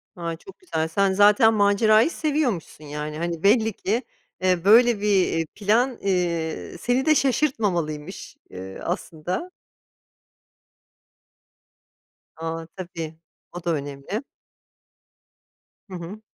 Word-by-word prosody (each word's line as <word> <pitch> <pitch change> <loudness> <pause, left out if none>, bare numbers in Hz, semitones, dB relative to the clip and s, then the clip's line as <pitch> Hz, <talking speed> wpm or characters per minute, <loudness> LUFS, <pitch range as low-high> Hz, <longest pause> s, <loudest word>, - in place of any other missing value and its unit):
Ha, 170 -1 -4
çok 390 - -15
güzel. 160 - -2
Sen 195 +3 +1
zaten 205 +3 +5
macerayı 215 +4 +4
seviyormuşsun 280 - -2
yani, 150 +1 -5
hani, 170 0 -3
belli 220 +1 +4
ki, 225 +8 -1 0.4
ııı, 180 -2 +2
böyle 230 +1 +6
bir, 210 - 0 0.2
eee, 165 0 -1
plan, 230 +5 +1
eee, 170 -4 -1
seni 245 +2 0
de 310 -1 +5
şaşırtmamalıymış, 195 - -1
eee, 95 +1 -8
aslında. 180 - -4 2.9
A, 165 0 -4
tabii, 165 -4 -7 0.3
o 175 - -6
da 170 - 0
önemli. 145 - -4 1.7
Hı 185 - -7
hı. 180 +5 -8
190 Hz, 105 wpm, -24 LUFS, 165-225 Hz, 2.9 s, böyle